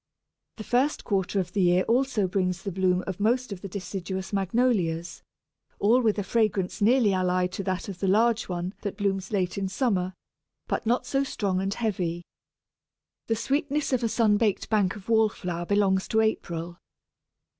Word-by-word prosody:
The 215 - -6
first 255 +6 +1
quarter 195 -1 0
of 180 -1 -3
the 200 - +1
year 180 +1 +4
also 235 -4 +1
brings 180 -1 -1
the 195 - -3
bloom 185 0 +1
of 190 0 -5
most 240 +3 +1
of 190 -3 -6
the - - -5
deciduous 190 0 -5
Magnolias, 190 -5 0 0.6
all 230 +5 +4
with 220 -3 +2
a 205 - -1
fragrance 200 -3 0
nearly 225 -1 +4
allied 180 -1 +1
to 195 - -4
that 185 -1 -2
of 190 -3 -7
the 195 - -1
large 225 +3 +2
one 180 +1 -3
that 200 -1 -4
blooms 195 -2 -1
late 185 -2 -1
in 195 - -1
summer, 190 -4 0 0.5
but - - -2
not 245 +2 +1
so 275 0 +1
strong 195 -8 -1
and 195 +2 -2
heavy. 180 -7 -2 1.0
The 225 - +1
sweetness 285 +4 -1
of 255 - +2
a 230 - 0
sun 215 -2 +3
baked 210 -1 0
bank 205 -4 +2
of 200 -2 -12
Wallflower 195 -6 0
belongs 195 -2 +2
to 220 - +2
April. 175 -5 -2
200 Hz, 175 wpm, -26 LUFS, 185-225 Hz, 1.0 s, year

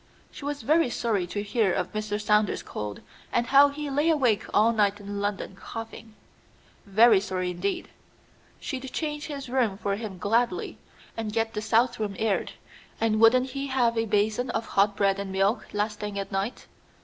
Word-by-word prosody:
She 280 - -9
was 290 -3 -4
very 310 +2 +3
sorry 215 -6 -1
to 205 +3 -3
hear 210 -2 +1
of - - -2
Mr. 215 -1 -2
Saunders's 210 -1 +2
cold, 105 -1 -6 0.3
and 240 - +1
how 280 +3 +6
he 295 +1 -5
lay 295 +4 +2
awake 255 -10 +2
all 225 +2 +4
night 205 -2 +2
in 200 0 -6
London 205 -1 -3
coughing; 225 +1 -9 0.7
very 215 +1 +6
sorry 185 -2 -2
indeed. 180 +3 -3 0.7
She'd 265 -2 -5
change 300 -1 -3
his 280 -3 -6
room 240 -6 0
for 200 -1 -2
him 210 -4 -6
gladly, 235 - 0 0.4
and 225 -2 -3
get 225 +1 -1
the 210 - -3
south 235 +2 +2
room 205 -2 -2
aired. 215 -3 0 0.5
And 220 -1 +1
wouldn't 255 +3 +5
he 275 0 -4
have 245 -3 +1
a 225 0 +1
basin 215 +4 +1
of 225 -1 -2
hot 200 +1 +2
bread 195 -1 +2
and 200 -1 -4
milk 195 +5 +1
last 210 +1 -2
thing 210 -1 -4
at 195 +1 -4
night? 195 +4 -3
220 Hz, 180 wpm, -26 LUFS, 200-245 Hz, 0.7 s, how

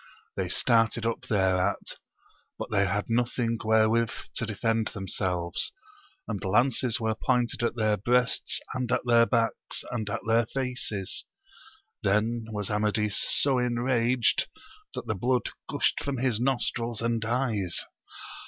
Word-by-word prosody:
They 95 -2 -2
started 115 +2 +2
up 115 0 -2
thereat, 95 -1 +1 0.6
but - - -6
they 100 -1 +3
had 100 +3 -1
nothing 115 -1 0
whereint^ 110 +1 +1
to 115 - -2
defend 110 +1 0
themselves, 90 -4 -2 0.5
and 105 -2 -4
lances 120 +3 +2
were 110 -1 0
pointed 120 +1 0
at 120 - 0
their 110 -2 +2
breasts 125 +5 +1
and 130 -2 -2
at 125 - +2
their 115 -1 +5
backs, 115 -2 0
and 110 -4 -2
at - - -2
their 115 0 +3
faces; 125 -7 -3 0.8
then 110 +3 +1
was 105 -2 -3
Amadis 105 0 +1 0.2
so 135 -3 +3
enraged 120 0 +2 0.5
that - - -5
the 110 - -1
blood 125 +5 0 0.2
gushed 145 0 +1
from 140 -2 -2
his 125 -3 +1
nostrils 120 -3 0
and 115 -1 0
eyes. 115 -6 0
115 Hz, 135 wpm, -28 LUFS, 105-120 Hz, 0.8 s, their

